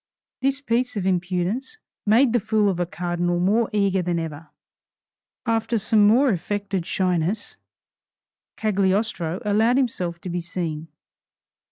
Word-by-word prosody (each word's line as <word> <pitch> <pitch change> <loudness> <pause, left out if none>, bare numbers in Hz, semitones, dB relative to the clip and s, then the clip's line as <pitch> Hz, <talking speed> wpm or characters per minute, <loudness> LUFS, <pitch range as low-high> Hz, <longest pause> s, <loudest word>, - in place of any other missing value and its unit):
This 275 +1 +1
piece 245 -2 0
of 190 - -2
impudence 185 - -1 0.3
made 235 +3 +5
the 240 - +4
fool 215 -1 +2
of 180 -2 -2
a 175 - 0
cardinal 175 0 -1
more 215 +6 +2
eager 200 -3 +1
than 175 -1 -1
ever. 160 -1 -5 1.0
After 230 +1 +1
some 210 0 +4
more 255 +6 +5
affected 195 -1 -2
shyness, 185 +1 -1 1.0
Cagliostro 195 -4 0
allowed 220 +4 +3
himself 180 -10 -1
to 180 - -6
be 175 0 -2
seen. 165 -2 -4
195 Hz, 130 wpm, -23 LUFS, 175-225 Hz, 1.0 s, made